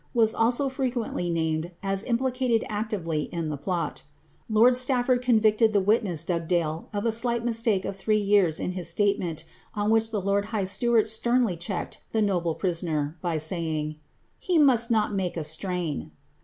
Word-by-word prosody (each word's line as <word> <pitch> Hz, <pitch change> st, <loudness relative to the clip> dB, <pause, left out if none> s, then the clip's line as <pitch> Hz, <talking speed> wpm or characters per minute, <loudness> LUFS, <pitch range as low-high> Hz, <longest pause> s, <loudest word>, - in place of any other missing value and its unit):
319 225 Hz, -3 st, +3 dB
BL8 -, -, +5 dB
also 245 Hz, +4 st, +2 dB
frequently 250 Hz, -9 st, -2 dB
named 160 Hz, 0 st, -1 dB
as 195 Hz, 0 st, 0 dB
implicated 250 Hz, -1 st, 0 dB
actively 200 Hz, -8 st, -2 dB
in 165 Hz, -2 st, -4 dB
the 150 Hz, -, -2 dB
plot 165 Hz, +2 st, -3 dB, 0.5 s
rd 250 Hz, +2 st, +3 dB
convicted 220 Hz, -2 st, +3 dB
the 205 Hz, -, +4 dB
witness 195 Hz, -5 st, +1 dB
Bugdale 165 Hz, -2 st, -1 dB
of 205 Hz, 0 st, -3 dB
a 230 Hz, -, +2 dB
slight 235 Hz, +1 st, 0 dB
mistake 225 Hz, -4 st, +1 dB
of 195 Hz, -, -4 dB
three 210 Hz, +2 st, 0 dB
3 185 Hz, -4 st, +3 dB
statement, 175 Hz, -2 st, 0 dB, 0.3 s
on 210 Hz, +1 st, 0 dB
which 225 Hz, 0 st, +3 dB
the 215 Hz, -2 st, -2 dB
lord 200 Hz, +1 st, 0 dB
high 210 Hz, -2 st, -2 dB
steward 230 Hz, +3 st, +2 dB
sternly 235 Hz, -2 st, +2 dB
checked 175 Hz, +2 st, -5 dB
[urisoner, 170 Hz, -6 st, 0 dB
by 170 Hz, -3 st, -1 dB
saying, 155 Hz, -1 st, -3 dB, 0.4 s
^he 355 Hz, -3 st, +2 dB
must 250 Hz, -5 st, +4 dB
not 215 Hz, -2 st, +1 dB
make 185 Hz, -3 st, -2 dB
a 160 Hz, -, -2 dB
strain." 160 Hz, -, -3 dB
205 Hz, 150 wpm, -26 LUFS, 170-230 Hz, 0.5 s, BL8